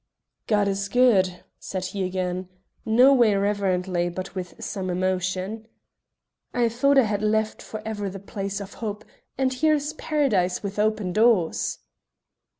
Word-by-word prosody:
"God 205 -2 +2
is 200 0 -1
good!" 195 -7 +3 0.2
said 185 -1 -4
he 190 +1 -3
again, 185 0 -3 0.4
no 250 +5 +6
way 235 -6 +4
reverently, 190 -3 0
but 185 +2 -6
with 180 -2 -6
some 190 -3 -4
emotion. 185 +4 -2 0.9
"I 240 -1 +3
thought 275 +5 +2
I 270 - +7
had 210 -2 -1
left 215 0 0
for 215 -1 -8
ever 205 -2 -3
the 195 - -7
place 195 0 -5
of 200 0 -8
hope, 215 -1 -4 0.3
and 260 0 +1
here's 300 +2 +1
Paradise 245 - 0
with 200 0 -4
open 215 -3 0
doors." 215 -6 +2
200 Hz, 145 wpm, -25 LUFS, 185-225 Hz, 0.9 s, I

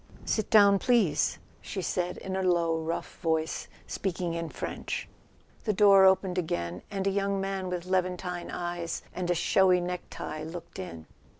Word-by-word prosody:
"Sit 220 - 0
down, 200 -2 +7
please," 215 -12 +2 0.2
she 190 - -5
said 180 0 -1
in 190 0 -5
a 190 - 0
low 170 -3 +2
rough 160 +1 -4
voice, 160 -1 -1 0.2
speaking 180 -3 -2
in 165 -1 -3
French. - - -4 0.6
The 215 - +2
door 195 -1 +7
opened 190 -1 +3
again, 85 - -3
and 195 -1 -3
a 195 - +3
young 200 0 0
man 195 -1 -2
with 180 -1 -3
Levantine 180 -1 -1
eyes 175 -1 -3
and 180 -1 -3
a 175 - +3
showy 185 +2 +4
necktie 175 -3 -5
looked 165 +2 -8
in. 85 -3 -7
180 Hz, 160 wpm, -29 LUFS, 170-190 Hz, 0.6 s, down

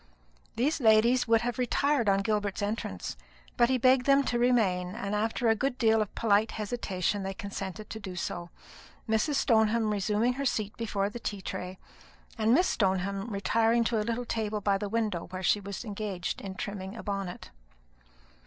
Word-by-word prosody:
These 285 +7 +1
ladies 235 +3 +4
would 225 -1 +4
have 240 0 -3
retired 250 -1 +2
on 195 0 +2
Gilbert's 205 -1 -1
entrance, 210 +3 -3 0.4
but 240 0 +4
he 260 - +3
begged 255 +1 +4
them 275 0 +5
to 240 -3 -1
remain; 195 -8 +2
and 200 0 -4
after 220 +3 0
a 225 - +6
good 260 +3 -1
deal 225 -3 +3
of 210 - -4
polite 215 -1 +2
hesitation 205 -3 -2
they 195 0 -4
consented 200 +1 -6
to 220 - -5
do 190 -3 -7
so, 175 0 -4 0.6
Mrs. 220 +7 +1
Stoneham 220 -3 +3
resuming 210 +4 +1
her 275 +2 -4
seat 215 -5 -1
before 205 -3 -2
the 240 - -7
tea 205 -4 -5
tray, 180 +1 -5 0.6
and 220 0 +1
Miss 340 +9 +5
Stoneham 195 +1 0
retiring 225 +3 +2
to 230 -1 0
a - - +1
little 235 +3 -2
table 215 -2 -2
by 200 -1 +1
the 205 -1 -3
window, 215 -6 -1
where 185 +1 -6
she 205 - +3
was 200 +3 -6
engaged 200 -4 -4
in 190 -1 -6
trimming 195 +1 -5
a - - -7
bonnet. 195 -3 -5
215 Hz, 180 wpm, -29 LUFS, 195-235 Hz, 0.6 s, a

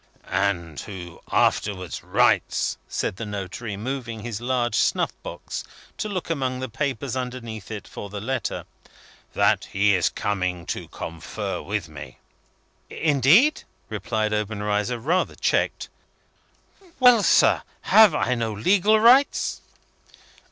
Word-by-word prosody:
" - - -33 0.3
And 85 -5 -8
who 90 -4 -9
afterwards 90 -5 0
writes," - - +2
said - - -3
the 115 - -5
notary, 100 +1 -5
moving 115 -1 -4
his 115 -1 -5
large 120 -1 0
snuff - - +2
box - - -6 0.4
to 215 - -2
look 185 -4 -3
among 130 -4 -1
the 130 - -3
papers 135 0 -3
underneath 125 -5 -5
it 105 -2 -7
for 100 - -8
the 105 +1 -6
letter, 120 +1 -3 0.7
"that - - +3
he 100 +1 +2
is 90 -3 +2
coming 90 -4 -2
to - - -4
confer 80 -1 -5
with - - -3
me." 65 - -10 0.7
"Indeed?" 160 - +4 0.3
replied 110 +1 -2
Obenreizer, 105 +2 -1
rather 165 +11 0
checked. - - 0 1.1
"Well, 250 -3 +7
sir. - - +4 0.2
Have 215 -7 +6
I 130 - +1
no 115 -2 -1
legal 200 - +3
rights?" 250 +5 +4
115 Hz, 125 wpm, -24 LUFS, 100-140 Hz, 1.1 s, Well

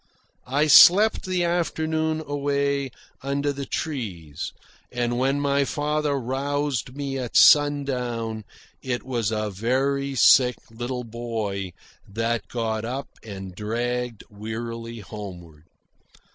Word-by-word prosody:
I 140 +4 +2
slept 195 +7 +7
the 180 -1 0
afternoon 160 -2 0
away 140 -1 -1 0.3
under 140 +1 -1
the 140 -1 -6
trees, 95 - -4 0.4
and 120 0 -1
when 135 +2 +1
my 140 0 +2
father 150 +1 -1
roused 135 0 -2
me 140 -1 -3
at 125 -2 -1
sundown 125 -7 +3 0.4
it 125 -2 -3
was 120 -5 -1
a 110 -1 -2
very 135 +6 0
sick 125 0 +6
little 125 +2 -4
boy 110 -5 -4 0.3
that 115 +3 -2
got 110 -2 -2
up 130 +4 -4
and 95 -3 -8
dragged 120 +3 -3
wearily 115 +2 -6
homeward. 90 -7 -10
125 Hz, 110 wpm, -24 LUFS, 110-140 Hz, 0.4 s, slept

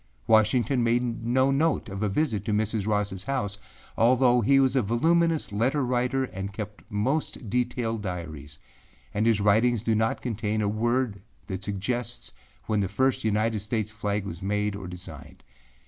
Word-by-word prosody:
Washington 115 +3 +3
made 120 0 0
no 130 +3 +3
note 155 0 +1
of 100 -1 -6
a 105 - +1
visit 110 -3 0
to 105 - 0
Mrs. 110 -1 0
Rossâ 105 -3 -1
house, 100 -7 -2 0.4
although 125 +1 +4
he 135 +5 +4
was 135 0 +3
a 130 - +4
voluminous 160 +9 +2
letter 130 +7 +1
writer 125 +2 +1
and 100 -5 -5
kept 105 -1 -6
most 115 +1 -2
detailed 120 -2 -1
diaries, 80 -7 -6 0.6
and 110 +2 +1
his 115 -3 +3
writings 110 +3 +3
do 115 - +1
not 110 +1 0
contain 110 -2 -1
a - - +1
word 115 0 0 0.2
that 95 -1 -5
suggests 115 +5 -3 0.3
when 110 -1 0
the 100 - +1
first 130 +5 +1
United 110 0 +1
States 105 +1 -2
flag 105 -2 -2
was 85 -2 -7
made 105 +1 -1
or 95 -3 -7
designed. 90 +1 -10
110 Hz, 165 wpm, -26 LUFS, 100-125 Hz, 0.6 s, although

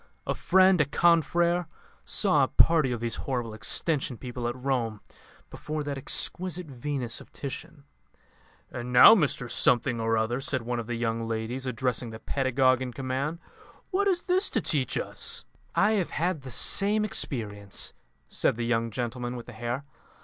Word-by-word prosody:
A - - 0
friend, 185 -2 +4
a - - +3
confrère, 170 +3 +2 0.4
saw - - +3
a - - +2
party 155 -6 +4
of 120 -2 -3
these 115 -1 -2
horrible 120 -4 -2
Extension 130 +4 0
people 125 -1 -5
at 120 - -3
Rome 125 -5 -2 0.5
before 155 0 -4
that 145 -1 -3
exquisite 180 +6 -2
Venus 130 -3 -3
of - - -16
Titian. 145 +2 -8 0.9
'And 120 +1 -6
now, 125 - +10
Mr 150 - +1
Something 120 0 +2
or 115 0 +1
other,' 115 +4 -1
said 130 -2 -1
one 120 +1 -2
of 115 - -6
the 120 - -3
young 115 0 -2
ladies, 115 +4 -3
addressing 125 0 -1
the 110 - -8
pedagogue 130 0 +1
in 125 -1 -4
command, 135 +5 -3 0.5
'what 400 +1 +1
is 360 -3 +1
this 375 +2 +2
to - - 0
teach 145 -9 0
us?'" - - -2 0.3
"I 205 - +4
have 200 -5 0
had 170 -1 -1
the 135 - -9
same 205 - +2
experience," 105 - -3 0.3
said - - +1
the 120 0 -3
young 115 -1 0
gentleman 120 +1 -4
with 120 - -7
the 125 - -11
hair. 120 +5 -4
130 Hz, 165 wpm, -27 LUFS, 120-155 Hz, 0.9 s, now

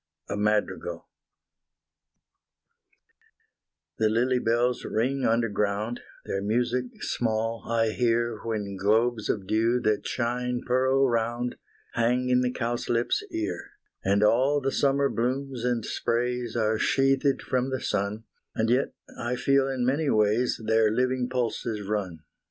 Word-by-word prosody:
A - - -2
MADRIGAL 105 0 -1 2.9
The 110 -1 +3
lily 125 +3 +2
bells 120 +2 +1
ring 130 +5 0
underground, 110 0 0 0.3
Their 95 - -2
music 120 +4 0 0.2
small 115 0 -1
I 115 -1 +2
hear 115 -1 0
When 105 -4 -3
globes 110 +3 +1
of 100 -3 -1
dew 115 +4 +2
that 105 -1 0
shine 125 0 -2
pearl 130 +2 +3
round 120 +1 -1 0.4
Hang 125 +2 +1
in 125 0 +4
the 125 - +1
cowslip's 120 -1 -1
ear 100 -5 -4 0.3
And 100 +2 +2
all 130 +7 +4
the 135 -1 -1
summer 140 0 +2
blooms 130 +1 -2
and 120 -3 0
sprays 120 0 -1
Are 110 -1 +1
sheathed 135 0 +2
from 130 0 0
the 130 -1 -2
sun, 100 +1 -2 0.3
And 115 +1 +1
yet 130 +3 +1 0.2
I 120 +1 -1
feel 135 +2 +2
in 130 -2 -1
many 140 +4 +1
ways 110 +3 +2
Their 110 0 +4
living 125 +2 0
pulses 115 -4 -2
run. 95 -6 -3
120 Hz, 130 wpm, -27 LUFS, 110-125 Hz, 2.9 s, in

